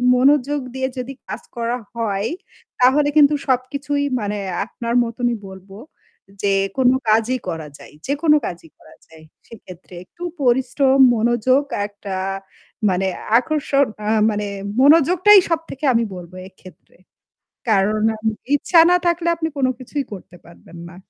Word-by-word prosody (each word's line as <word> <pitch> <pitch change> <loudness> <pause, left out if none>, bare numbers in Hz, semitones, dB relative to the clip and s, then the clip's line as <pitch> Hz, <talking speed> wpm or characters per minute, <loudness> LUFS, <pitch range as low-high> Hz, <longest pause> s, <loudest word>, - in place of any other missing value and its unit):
মনোযোগ 285 +2 +2 0.2
দিয়ে 260 0 -1
যদি 255 +2 -5
কাজ - - -6
করা 235 +1 -2 0.2
হয় 215 -2 -2 0.5
তাহলে 285 +4 +4
কিন্তু 295 0 +6
সবকিছুই 280 +3 -1 0.2
মানে 210 -1 -3 0.3
আপনার 235 +1 -5
মতনই 240 +1 -2
বলব 190 0 -13 0.7
যে 200 -1 +2 0.2
কোনো 255 -1 +4
কাজই 225 +4 +2
করা 165 -3 -5
যায় - - -15
যেকোনো 295 +3 +2
কাজই 170 -2 -7
করা 155 - -19
যায়। 160 -1 -17 0.2
সেক্ষেত্রে 185 -5 -14
একটু 345 - -13 0.2
পরিশ্রম, 265 +1 +2 0.2
মনোযোগ 240 +4 +2 0.2
একটা 205 -1 -8 0.7
মানে 190 +1 0 0.3
আকর্ষণ 280 +1 +1 0.2
আ - - -3 0.2
মানে 210 0 -3 0.4
মনোযোগটাই 340 +8 +6
সবথেকে 320 -4 -3
আমি 230 0 +2
বলব 175 -1 -10 0.2
এক্ষেত্রে। 185 -1 -18 0.7
কারণ 215 +1 +2 0.2
আমি 220 0 -1 0.2
ইচ্ছা 330 +4 +3
না - - +5
থাকলে 340 0 0
আপনি 320 -1 -3
কোনো 260 -2 +1
কিছুই 275 +3 -4
করতে 190 -3 -10
পারবেন 170 0 -16
না। 175 - -14
245 Hz, 135 wpm, -20 LUFS, 205-285 Hz, 0.7 s, কিন্তু